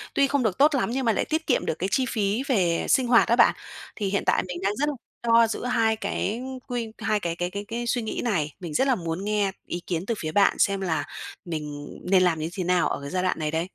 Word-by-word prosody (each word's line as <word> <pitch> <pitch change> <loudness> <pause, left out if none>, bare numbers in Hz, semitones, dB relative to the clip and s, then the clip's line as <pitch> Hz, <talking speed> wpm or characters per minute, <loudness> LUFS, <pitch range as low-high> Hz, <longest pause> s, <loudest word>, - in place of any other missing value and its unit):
tuy 280 - +4
không 280 -2 +1
được 215 -2 0
tốt 290 +2 +5
lắm, 245 - 0
nhưng 260 +1 -1
mà 225 - +4
lại - - 0
tiết 320 +1 -2
kiệm - - +2
được - - -1
cái 190 +2 -1
chi 260 - +2
phí 215 +2 0
về 180 -10 +1
sinh 255 -2 +3
hoạt 235 -1 +5
á 235 - +4
bạn. 235 - +5 0.4
Thì 205 -3 -2
hiện 200 - 0
tại - - +2
mình 180 -1 -5
đang 200 +1 +1
rất 295 +2 +1
là 290 - -3 0.3
lo 230 0 +6
giữa 230 +2 -4
hai 225 -3 +2
cái 220 +1 -2 0.3
quy 240 -3 -3
hai 215 -1 0
cái 170 -3 -3
cái 175 0 -2
cái 200 +2 -6
cái 235 +1 -4
suy 240 0 +1
nghĩ 220 - -3
này, 160 -11 0
mình 170 -4 -6
rất 265 - +2
là 260 - +3
muốn 170 +1 -4
nghe 210 -2 +1 0.2
ý 175 - -4
kiến 170 0 -2
từ 230 - 0
phía 155 -1 -3
bạn 200 +2 +3
xem 195 -1 +2
là 160 -5 -1 0.4
mình 150 -3 -5 0.2
nên 185 -1 +6
làm 170 -3 +2
như 155 +2 -2
thế 185 -1 -3
nào 180 0 +2
ở - - -3
cái 140 - -6
giai 185 0 -1
đoạn 185 - 0
này 150 -1 -1
đây? 165 +3 -1
200 Hz, 275 wpm, -25 LUFS, 175-235 Hz, 0.4 s, lo